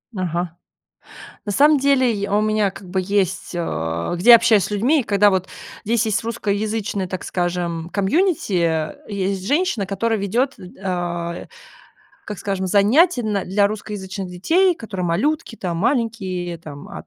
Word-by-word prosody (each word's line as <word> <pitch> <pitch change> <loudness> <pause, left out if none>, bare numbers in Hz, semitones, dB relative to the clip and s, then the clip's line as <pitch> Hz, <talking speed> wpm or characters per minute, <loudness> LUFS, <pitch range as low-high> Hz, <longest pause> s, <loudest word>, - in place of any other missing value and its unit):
Ага. 175 -2 -3 0.9
На 205 - -1
самом 295 +7 +5
деле, 260 -3 +3
и, 200 0 -3
у 205 +1 +2
меня 215 -1 +1
как 195 0 -12
бы 190 +1 0
есть, 195 -1 -1
э, 85 - -2
где 190 +8 +4
я 235 - +12
общаюсь 225 -3 +3
с - - -5
людьми, 250 +9 +2
когда, 205 -2 +3
вот 190 -1 -1 0.4
Здесь 230 +1 +1
есть 215 - 0
русскоязычное, 210 -2 -2
так 185 0 -5
скажем, 175 -2 -2
комьюнити, 270 - +1
э, 160 -2 0
есть 195 -2 -2
женщина, 285 - +1
которая 220 +3 -1
ведет, 235 +8 -1
э, - - -11 0.2
а, 175 -2 -3 0.8
как 210 -3 -6
скажем, 190 0 -2
занятия 245 - +4
на 210 -3 -1
для 200 +2 +2
русскоязычных 200 -2 -5
детей, 335 - +2
которые 210 - -5
малютки 280 - -1
там 175 -5 -3
маленькие, 195 -7 -1
там 145 -3 -10
от - - -9
200 Hz, 155 wpm, -21 LUFS, 180-225 Hz, 0.9 s, я